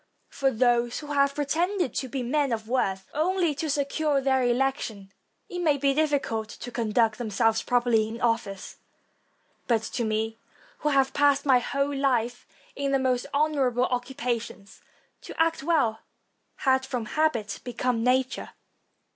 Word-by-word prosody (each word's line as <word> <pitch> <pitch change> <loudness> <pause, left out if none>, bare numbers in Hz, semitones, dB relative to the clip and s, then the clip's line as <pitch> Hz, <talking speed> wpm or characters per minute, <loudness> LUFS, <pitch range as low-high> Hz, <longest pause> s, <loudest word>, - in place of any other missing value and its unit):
For 275 -1 +1
those 240 -1 +2
who 295 -1 -6
have 280 0 +2
pretended 330 - 0
to 265 - -2
be 255 +1 -3
men 275 +2 0
of 220 -1 -3
worth 195 -6 -1
only 345 +1 +1
to 305 +2 -3
secure 285 +1 +1
their 265 -1 +2
election, 240 -5 -1 0.4
it 355 - -5
may 310 -5 +2
be 275 0 +2
difficult 275 -8 0
to 245 - -8
conduct 225 -1 +1
themselves 225 0 +1
properly 240 -3 +2
in 225 +1 -7
office; 230 -5 -2 0.9
but 230 -3 +2
to 235 - -3
me, 220 0 -2 0.4
who 300 - 0
have 270 -2 +2
passed 285 -1 +3
my 260 -3 +5
whole 280 +3 -1
life 245 -3 0 0.3
in 275 0 -1
the - - +5
most 255 -2 0
honorable 280 -4 +1
occupations, 245 -5 -4 0.4
to - - -10
act 325 -2 +2
well 275 -8 +1 0.6
had 265 -1 +2
from 250 -4 -3
habit 235 -6 0
become 245 -1 -1
nature. 255 +1 0
260 Hz, 145 wpm, -26 LUFS, 230-285 Hz, 0.9 s, my